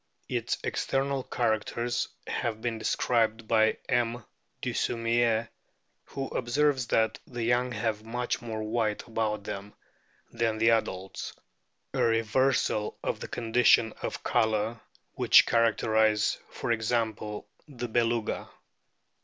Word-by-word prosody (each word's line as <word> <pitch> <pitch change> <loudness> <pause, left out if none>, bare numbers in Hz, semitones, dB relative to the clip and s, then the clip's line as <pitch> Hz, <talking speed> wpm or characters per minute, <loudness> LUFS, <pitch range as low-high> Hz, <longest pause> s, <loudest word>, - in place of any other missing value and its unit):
Its - - -1
external 135 0 0
characters 120 0 -1 0.2
have 110 -2 -2
been 115 -1 -2
described 115 -1 +1
by 110 -1 +3
M. 120 -1 0 0.3
Dussumier, 115 -1 +1 0.6
who 135 -1 -5
observes 130 +1 +1
that 110 0 +1
the 120 -2 -4
young 120 +2 +2
have 110 -1 -2
much 120 +2 -2
more 110 -2 -4
white 110 -1 -1
about 110 -2 -1
them 100 +1 -6 0.6
than 115 -1 0
the 115 +1 +4
adults 95 -4 -2 0.6
a - - 0
reversal 115 -1 +1
of - - -2
the - - -6
conditions 115 -1 +3
of - - -4
colour 110 +1 +1 0.3
which - - +6
characterise, 110 -2 +2
for - - -3
example, 110 -2 -1 0.2
the 125 -4 -5
Beluga. 115 -1 0
115 Hz, 110 wpm, -28 LUFS, 110-120 Hz, 0.6 s, which